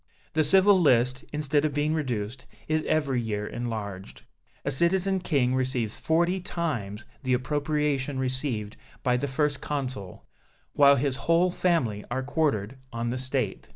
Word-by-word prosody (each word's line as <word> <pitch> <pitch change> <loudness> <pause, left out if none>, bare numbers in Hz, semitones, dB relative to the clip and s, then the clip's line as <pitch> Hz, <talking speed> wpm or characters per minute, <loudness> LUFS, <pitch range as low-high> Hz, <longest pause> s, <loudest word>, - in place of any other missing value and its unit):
The 155 - +3
civil 190 +4 +6
list, 125 -3 +3
instead 150 -1 0
of 150 -2 -1
being 150 +1 +1
reduced, 125 -5 -3 0.2
is 155 0 +1
every 140 -5 +1
year 105 -2 -3
enlarged. 105 -5 -5 0.4
A 140 - +1
Citizen 190 +6 +2
King 140 -8 +1
receives 130 -4 -1
forty 170 +4 +1
times 130 - -3 0.2
the 130 -2 0
appropriation 145 0 -1
received 130 -5 -3 0.3
by 125 -2 +2
the 135 +3 -1
First 145 +1 0
Consul, 130 -10 -4 0.5
while 140 -1 +6
his 135 0 0
whole 170 +5 +2
family 145 - 0
are 130 +2 -2
quartered 135 -5 -1
on 115 0 -2
the 130 - -3
State. 130 0 -3
135 Hz, 145 wpm, -27 LUFS, 120-155 Hz, 0.5 s, civil